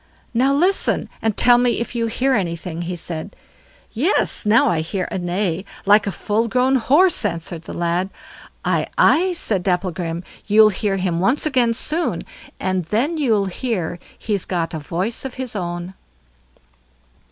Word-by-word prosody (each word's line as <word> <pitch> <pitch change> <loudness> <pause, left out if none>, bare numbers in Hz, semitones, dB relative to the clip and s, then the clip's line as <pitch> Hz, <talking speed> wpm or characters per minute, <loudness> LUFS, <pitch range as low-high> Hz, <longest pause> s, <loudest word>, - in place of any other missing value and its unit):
"Now 255 +4 +3
listen, 360 +8 +1
and 220 -2 -1
tell 245 0 +6
me 245 -1 +2
if 235 - -4
you 230 -1 -1
hear 260 +4 +1
anything", 170 -5 -2
he 175 +1 -4
said. 165 -2 -5 0.6
"Yes, 275 - +1
now 220 +2 +5
I 170 - +1
hear 180 +3 -3
a - - -2
neigh 175 0 -1 0.2
like 205 +1 +5
a - - 0
full 215 +5 -1
grown 255 +3 +2
horse", 295 +7 +4
answered 170 -3 -2
the - - -9
lad. 175 +2 -1 0.6
"Aye! - - +1
aye!" 365 +3 +4
said 215 - -1
Dapplegrim, 175 -2 -2 0.2
"you'll 215 0 +6
hear 200 -1 -1
him 180 -3 -1
once 250 - +2
again 250 -6 +2
soon, 320 +8 -1 0.4
and 185 -2 -1
then 255 - 0
you'll 225 -9 +2
hear 185 -4 -3 0.2
he's 205 -4 -2
got 170 -3 -2
a 160 - -3
voice 180 +9 -2
of 265 -2 -6
his 255 -3 -5
own." 175 -1 -4
205 Hz, 160 wpm, -20 LUFS, 175-245 Hz, 0.6 s, tell